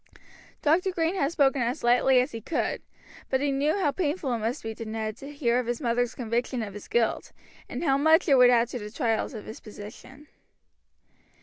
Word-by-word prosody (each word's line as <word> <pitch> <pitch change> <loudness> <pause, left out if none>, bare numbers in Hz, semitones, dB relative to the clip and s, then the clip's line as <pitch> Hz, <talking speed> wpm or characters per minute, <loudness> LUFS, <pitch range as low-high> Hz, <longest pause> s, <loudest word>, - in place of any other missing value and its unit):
Dr. 335 +6 +3
Green 330 -1 0
had 295 -6 0
spoken 280 -5 +2
as 240 +2 -2
lightly 250 +2 +4
as 255 +4 0
he 225 - -6
could, 330 - -2 0.5
but 265 - +1
he 285 +1 0
knew 290 +6 +1
how 335 -7 +1
painful 300 -5 -1
it 235 - -1
must 225 +3 -3
be 225 0 -4
to 230 - -7
Ned 220 -1 -4
to 275 +3 -9
hear 250 -4 +1
of 250 - -3
his 240 -1 -2
mother's 245 -2 0
conviction 240 0 -2
of 200 -2 -7
his 205 - -10
guilt, 235 -2 0 0.4
and - - -4
how 275 -4 +2
much 315 +4 +4
it 285 - +5
would 250 -2 +7
add 240 -1 +4
to 245 - -5
the 210 -1 -7
trials 230 0 -1
of 215 - -8
his 220 - -9
position. 240 +7 -12
250 Hz, 210 wpm, -27 LUFS, 230-285 Hz, 0.5 s, would